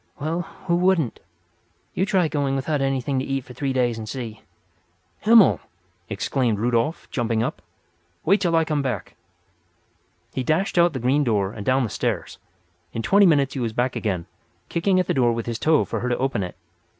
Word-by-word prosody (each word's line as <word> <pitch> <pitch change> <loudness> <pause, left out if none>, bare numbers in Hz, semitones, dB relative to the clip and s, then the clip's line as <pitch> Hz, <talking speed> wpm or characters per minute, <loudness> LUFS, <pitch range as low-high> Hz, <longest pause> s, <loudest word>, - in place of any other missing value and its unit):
"Well, 160 +4 -1 0.2
who 170 -2 +2
wouldn't? 180 -8 +1 0.7
You 190 - 0
try 185 -4 +2
going 140 -3 -1
without 140 +2 -1
anything 135 0 0
to - - -2
eat 135 -1 -2
for 125 - -11
three 135 +1 -2
days 120 -3 0
and 110 -1 -7
see!" 115 -4 -6 0.8
"Himmel!" 220 -2 +6 0.5
exclaimed 110 +3 0
Rudolf, 120 +7 0
jumping 115 -4 0
up. - - -4 0.6
"Wait 195 +5 +4
till 170 -3 +2
I 165 0 +3
come 150 -2 0
back." 125 -8 -3 1.2
He - - -1
dashed 165 +7 +1
out 170 -1 +4
the 130 - -3
green 130 +5 +2
door 105 -6 +1
and 105 - -7
down 130 +4 +2
the 115 - -2
stairs. - - -3 0.5
In 115 - -3
twenty 200 - +5
minutes 140 -4 +3
he 135 - -4
was 115 -3 -2
back 125 +2 0
again, 95 -6 -2 0.4
kicking 185 +2 +2
at 185 - +1
the - - 0
door 120 -3 +3
with 115 -1 -3
his 115 -1 -3
toe 155 -1 +3
for - - -3
her 125 - -2
to 120 - 0
open 130 -5 -1
it. 90 -1 -5
135 Hz, 190 wpm, -23 LUFS, 115-160 Hz, 1.2 s, Himmel